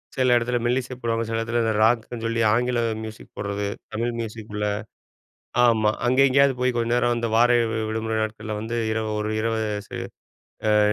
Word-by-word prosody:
சில 130 -2 +3
இடத்துல 120 +1 0
மெல்லிசை 125 +1 0
போடுவாங்க. 115 -1 -1
சில 115 - -1
இடத்துல 120 +1 0
இந்த 110 -1 +1
ராக்குன்னு 115 0 +1
சொல்லி 115 0 0
ஆங்கில 120 0 +1 0.2
மியூசிக் 110 0 -10
போடுறது 100 0 -2 0.3
தமிழ் 120 +2 -1
மியூசிக் 110 -1 -6
உள்ள 105 0 -1 1.0
ஆமா, 110 -3 +4 0.2
அங்கே 130 +3 +4
எங்கேயாவது 140 +1 +4
போய் 125 0 +1
கொஞ்ச 115 0 0
நேரம் 120 0 +2
வந்து, 120 0 -1
வார 120 +1 +5 0.4
விடுமுறை 110 0 -2
நாட்களில் 110 -1 -4
வந்து 115 +2 -4 0.2
இரவு 110 -1 -1
1 105 0 -2
இரவு 115 0 0 0.3
ச - - -25 0.9
அ - - +5
115 Hz, 170 wpm, -24 LUFS, 110-120 Hz, 1.0 s, வார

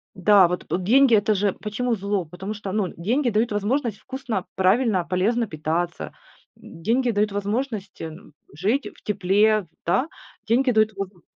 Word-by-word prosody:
Да, 190 -1 +6
вот 180 +1 -4
п - - 0
деньги, 240 +7 +5
это 215 +1 +3
же 200 -1 +1
почему 230 +3 -2
зло, 200 -2 -2
потому 180 +6 -6
что, 200 -2 -6
ну, 200 -3 -1
деньги 240 - +1
дают 225 +1 +1
возможность 215 +2 -1
вкусно, 250 -8 -4
правильно, 190 +1 +2
полезно 205 +7 0
питаться. 160 +2 -3 0.4
Деньги 235 +9 -1
дают 210 -1 +1
возможность, 205 0 -3
м, 160 +2 -9 0.2
жить 210 - 0
в - - -21
тепле, 205 0 +2 0.2
да? 250 - +1 0.4
Деньги 250 +4 +3
дают 220 -2 +3
возм 195 -3 -7
205 Hz, 155 wpm, -23 LUFS, 185-230 Hz, 0.4 s, Да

